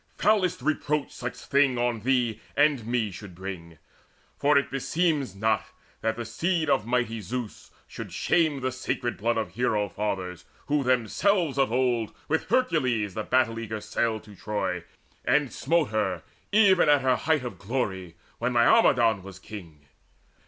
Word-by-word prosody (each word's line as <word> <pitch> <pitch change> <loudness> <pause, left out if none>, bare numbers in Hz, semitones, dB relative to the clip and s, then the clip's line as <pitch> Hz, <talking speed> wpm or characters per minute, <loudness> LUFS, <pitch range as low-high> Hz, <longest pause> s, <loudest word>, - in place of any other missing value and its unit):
Foulest 185 -9 +2
reproach 150 -1 0
such - - -5
thing 140 -2 +2
on 120 -1 0
thee 120 -1 0 0.2
and 145 -6 +3
me 115 -4 0
Should 90 -1 -10
bring; 85 -3 -7 0.6
for 145 0 +3
it 140 - +1
beseems 145 - 0
not 110 +2 +1 0.4
that 110 0 0
the 120 0 -5
seed 160 +7 0
Of 105 - +1
mighty 120 -2 0
Zeus 120 0 -6 0.2
should - - -8
shame 155 -5 +1
the 130 0 -1
sacred 125 -1 -2
blood 115 +2 0
Of 110 -5 -2
hero 110 -4 0
fathers, 95 -4 -3 0.2
who 145 -1 +1
themselves 140 - +1
of 135 -4 +2
old 120 -3 0
With 160 +1 0
Hercules 130 - +1
the 110 - -3
battle 115 -1 +1
eager 110 -1 -4
sailed 110 0 -1
To 105 -2 -14
Troy, 90 -4 -3 0.4
and 145 -2 +2
smote 170 -1 +1
her 95 -6 -1 0.3
even 200 -6 +5
at 145 -1 +5
her 130 -1 +3
height 155 -1 +1
Of 120 - -6
glory, 95 -6 -3 0.2
when 125 +2 0
Laomedon 120 - +4
was 95 0 -10
king. 90 -8 -11
120 Hz, 155 wpm, -27 LUFS, 105-140 Hz, 0.6 s, even